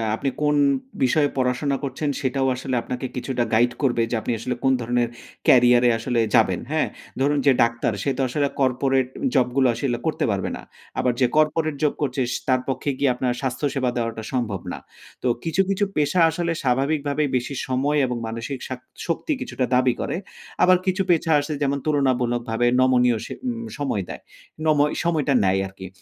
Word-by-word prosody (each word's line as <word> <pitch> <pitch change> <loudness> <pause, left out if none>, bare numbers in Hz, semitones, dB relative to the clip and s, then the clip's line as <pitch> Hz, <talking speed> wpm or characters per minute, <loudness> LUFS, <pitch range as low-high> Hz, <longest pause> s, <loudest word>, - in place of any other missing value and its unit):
আপনি 135 - -1
কোন 150 0 +2 0.5
বিষয়ে 145 +3 +3
পড়াশোনা 130 +2 +1
করছেন 145 +2 -2
সেটাও 135 0 0
আসলে 130 +1 -3
আপনাকে 125 +2 -5
কিছুটা 125 -1 -1
গাইড 120 +2 +4
করবে 120 -4 +2
যে - - +1
আপনি - - -2
আসলে 125 +2 -3
কোন 135 - +4
ধরনের 120 0 0 0.4
ক্যারিয়ারে 125 -1 +6
আসলে 120 +1 -1 0.2
যাবেন, - - +3
হ্যাঁ? - - +1 0.3
ধরুন 145 +2 +2
যে - - +8
ডাক্তার 115 -1 0
সে 140 - 0
তো - - 0
আসলে 140 +3 +1
কর্পোরেট 130 0 +2 0.3
জবগুলো 130 +1 +3
আসলে 120 -3 -1
করতে 160 - 0
পারবে 100 -1 -1
না। - - -8 0.4
আবার 125 -1 +2
যে - - +6
কর্পোরেট 155 0 +2
জব 150 - +3
করছে 135 -2 -1
স - - -1
তার 130 -1 +3
পক্ষে 130 +2 -2
গিয়ে 140 -1 +2
আপনার 125 0 0
স্বাস্থ্য 135 +2 -2
সেবা 130 -2 +1
দেওয়াটা 115 -1 -3
সম্ভব 110 -7 -1
না। - - -5 0.5
তো - - +1 0.2
কিছু, 165 +3 +1
কিছু 200 +1 +1
পেশা 150 +4 +2
আসলে 170 +1 -2
স্বাভাবিকভাবেই 140 +3 +1
বেশি 125 +3 -4
সময় 135 +3 +1
এবং 125 -1 -2
মানসিক 115 +4 -5
শাক 130 -1 -5 0.3
শক্তি 170 - -1
কিছুটা 135 - -2
দাবি 125 -1 +3
করে। - - -2 0.5
আবার 185 0 +6
কিছু 185 +1 +1
পেশা 165 -1 +2
আসে 145 +2 -4
যেমন 140 0 +1
তুলনামূলকভাবে 120 -5 +1
নমনীয় 125 -2 +4
স - - -8 0.5
সময় 135 -9 -1
দেয়। - - -7 0.4
নম 155 -2 +3 0.2
সময়টা 155 -5 +1
নেয় 95 0 +2
আরকি। 95 0 -10
130 Hz, 175 wpm, -23 LUFS, 120-145 Hz, 0.5 s, যে